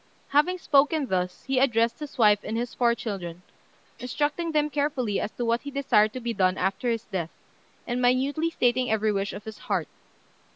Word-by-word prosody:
Having 300 +6 +3
spoken 295 -2 +3
thus, 180 -5 -2
he 270 -1 0
addressed 230 -3 +2
his 300 -2 -8
wife 210 -3 +5
and 225 - -3
his 240 0 -3
four 235 -1 +2
children, 180 -6 -6 0.6
instructing 295 +6 -1
them 300 -1 +2
carefully 275 -7 0
as - - -2
to 240 - -3
what 235 +1 +1
he 285 - -6
desired 260 -6 +2
to 255 - -4
be 235 -1 -3
done 185 -2 +2
after 195 +6 -1
his 230 -1 -1
death, 180 -5 -3 0.6
and 245 0 -2
minutely 270 +6 +2
stating 250 -5 +1
every 220 0 +2
wish 200 0 -1
of 205 - -8
his 220 -1 -9
heart. 185 -7 -2
240 Hz, 190 wpm, -26 LUFS, 210-280 Hz, 0.6 s, wife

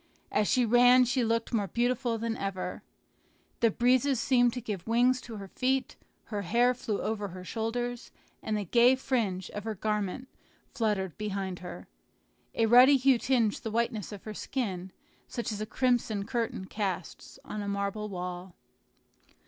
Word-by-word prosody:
As 210 0 +2
she 250 -1 +3
ran 245 +2 +6
she 255 +1 +1
looked 230 +1 0
more 205 -3 +1
beautiful 240 +3 0
than 225 0 -2
ever. 195 -3 -4 0.8
The 230 - +4
breezes 250 +3 +2
seemed 245 -2 +3
to 250 - -3
give 210 -6 -5
wings 250 +3 +3
to 235 -2 -9
her 200 -2 -7
feet; 260 +4 -1 0.3
her 210 -2 -4
hair 235 +6 +3
flew 225 -4 -3
over 210 -2 -2
her 185 -1 -9
shoulders, 240 +4 -3 0.3
and 215 -1 -1
the 205 - -3
gay 240 +7 +5
fringe 220 -9 -1
of 205 - -6
her 220 -1 -3
garment 210 +4 -2 0.5
fluttered 205 -6 -1
behind 195 -3 -3
her. 180 - -9 0.7
A 225 - +3
ruddy 250 +5 +7
hue 265 -1 +4
tinged 235 -5 +1
the 225 - -4
whiteness 220 -3 -1
of 205 -2 -9
her 215 - -6
skin, 190 -7 -4 0.4
such 235 -1 -4
as 210 0 -4
a 215 - -3
crimson 235 -4 0
curtain 230 -4 -2
casts 190 -4 -4
on 210 - -5
a 205 - -4
marble 200 +1 -2
wall. 180 -1 -6
225 Hz, 165 wpm, -29 LUFS, 200-245 Hz, 0.8 s, ruddy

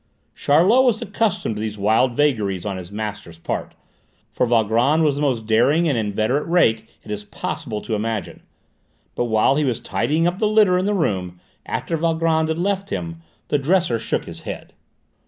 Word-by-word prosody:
Charlot 185 - +4
was 240 -4 +2
accustomed 200 - -1
to - - -4
these 110 -1 -4
wild 110 +5 +2
vagaries 105 -11 0
on 100 -2 -3
his 90 0 -9
master's 105 -5 -6
part, 80 - -5 0.6
for 125 - 0
Valgrand 120 +7 +2
was 150 -2 +3
the 145 - -3
most 125 -6 0
daring 130 +10 +3
and 145 - +1
inveterate 110 +6 -1
rake 115 -11 +2
it - - -9
is 105 0 -4
possible 115 0 -5
to 115 - -5
imagine. 110 0 -3 0.7
But 120 - -1
while 110 +4 +2
he 150 - +2
was 125 -4 -1
tidying 155 +9 0
up 175 +2 0
the 215 - +2
litter 210 -3 +4
in 185 - -1
the 205 0 +1
room, 95 - -2 0.3
after 165 - -2
Valgrand 160 0 +1
had 160 0 -1
left 195 +2 -1
him, 85 -3 -5 0.3
the 145 - +2
dresser 155 -5 +1
shook 110 - -2
his - - -9
head. - - -8
125 Hz, 180 wpm, -21 LUFS, 110-165 Hz, 0.7 s, Charlot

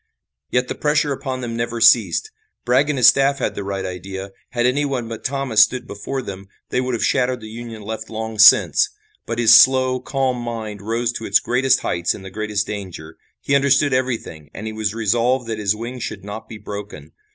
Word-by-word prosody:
Yet 125 0 0
the - - -3
pressure 150 -1 0
upon 130 -1 -5
them 115 -2 -4
never 115 0 -3
ceased. 110 -6 +4 0.3
Bragg 130 +4 +2
and 145 - -1
his 125 - +3
staff 140 0 +2
had - - -2
the 100 - -5
right 95 -1 -4
idea. 95 +1 -6 0.2
Had 120 -1 -1
anyone 130 -2 0
but 115 -1 -7
Thomas 135 -5 +2
stood 120 +3 +2
before 130 +7 -5
them 95 -2 -8 0.2
they 125 - 0
would 130 -1 -2
have - - -1
shattered 125 -2 +1
the 110 -1 -10
Union 115 -1 -8
left 110 +1 -6
long 110 -1 -5
since, 110 - +6 0.4
but 115 - -3
his 115 -1 +6
slow, 130 +2 +6
calm 130 0 -1
mind 115 -4 -6
rose 115 +3 -1
to 115 -1 -6
its 100 - +4
greatest 125 +2 +1
heights 85 0 -1
in - - -11
the 95 - -9
greatest 105 -1 -2
danger. 90 -6 -7 0.3
He 140 - -2
understood 140 0 +3
everything 120 - -3
and 110 - -7
he 110 - -5
was 110 -1 -2
resolved 120 +3 +1
that 110 -1 -3
his 105 0 +1
wing 120 +3 -6
should 100 -4 -6
not 105 +2 -8
be 110 - -8
broken. 100 -8 -8
115 Hz, 205 wpm, -20 LUFS, 105-130 Hz, 0.4 s, since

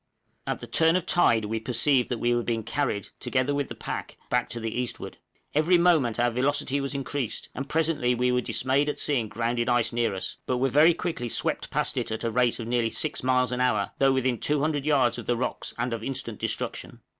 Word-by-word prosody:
At - - -2
the - - -6
turn 165 +1 +3
of 185 - 0
tide 115 -10 +3
we 110 +2 -2
perceived 125 +3 +1
that 125 - -1
we 120 +1 +1
were 120 - +1
being 115 -1 -2
carried, 115 -3 -2
together 130 +2 0
with 145 -1 -1
the - - -6
pack, - - -6
back 125 -1 +1
to 120 0 -5
the 115 -1 -3
eastward; 125 - -6 0.4
every 155 +4 +4
moment 160 -10 +3
our 120 0 +3
velocity 135 +2 +1
was 140 +1 -3
increased, 135 -3 -3
and 135 +2 -5
presently 155 -6 +1
we 125 +1 +1
were 125 0 +2
dismayed 135 +4 +1
at - - -3
seeing 130 -7 0
grounded 120 +2 -1
ice 120 -2 +2
near 120 -4 0
us, 95 - -5
but 125 - 0
were 135 +2 +1
very 155 +5 +5
quickly 165 -10 -3
swept - - -1
past - - -1
it - - -1
at 110 - -4
the 115 - -1
rate 125 +1 +2
of 115 - -4
nearly 120 -1 +1
six 155 +6 -2
miles 125 -1 +2
an 125 0 -1
hour, 125 0 +1
though 135 0 +5
within 130 -2 0
200 150 0 0
yards 135 -6 +3
of - - -9
the 120 - +1
rocks, 125 - -3
and 120 0 -1
of 115 -1 -4
instant 125 -4 -4
destruction! - - -3
125 Hz, 225 wpm, -26 LUFS, 120-145 Hz, 0.4 s, very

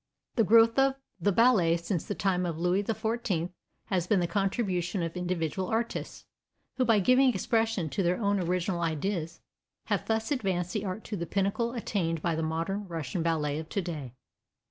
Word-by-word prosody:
The 230 - +4
growth 230 +3 +5
of 270 0 +4 0.2
the 200 +4 +2
ballet 195 -7 +4
since 170 0 -3
the 205 - -3
time 180 0 +1
of 170 -3 -2
Louis 180 +3 +2
XIV 220 -5 -1 0.3
has 180 -3 -1
been 205 -1 +3
the 175 - +1
contribution 190 -2 -1
of 165 +1 -4
individual 180 0 -2
artists, 230 +3 -3 0.5
who 255 - +2
by 225 -2 +4
giving 255 +7 +5
expression 225 -7 0
to 195 - -1
their 180 0 +1
own 200 -2 +1
original 180 0 -1
ideas 170 +1 -2 0.5
have - - -1
thus 220 +1 0
advanced 185 -9 -1
the 210 -1 -2
art 195 +3 -4
to 215 - -5
the 170 -3 -4
pinnacle 200 +4 0
attained 180 -8 -1
by 170 - +1
the 160 - -1
modern 165 +6 -2
Russian 165 -2 -3
ballet 155 -3 0
of 160 0 -8
today. 155 - -4
185 Hz, 175 wpm, -29 LUFS, 170-220 Hz, 0.5 s, growth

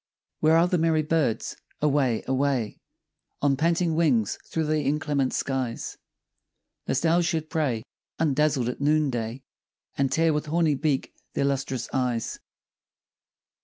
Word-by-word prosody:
Where 160 +1 +5
are 170 +2 +4
the 180 -1 +1
merry 160 -1 +2
birds? 150 -7 0 0.2
Away, 140 -6 +2
away, 130 -4 0 0.6
On 140 -1 +4
panting 165 +3 +1
wings 140 -10 +2
through 160 -1 -1
the 155 0 +1
inclement 145 -2 0
skies, 130 -4 -2 0.9
Lest 135 - 0
owls 170 +1 +3
should 160 -2 -2
prey 130 -9 0 0.3
Undazzled 150 -4 +2
at 125 - -4
noon 150 0 +3
day, 120 +2 -4 0.5
And 135 -2 +1
tear 160 +2 +3
with 150 0 -2
horny 160 0 +2
beak 140 0 -1 0.2
their 140 - +1
lustrous 135 -3 -1
eyes. 125 -3 -1
145 Hz, 130 wpm, -26 LUFS, 130-160 Hz, 0.9 s, Where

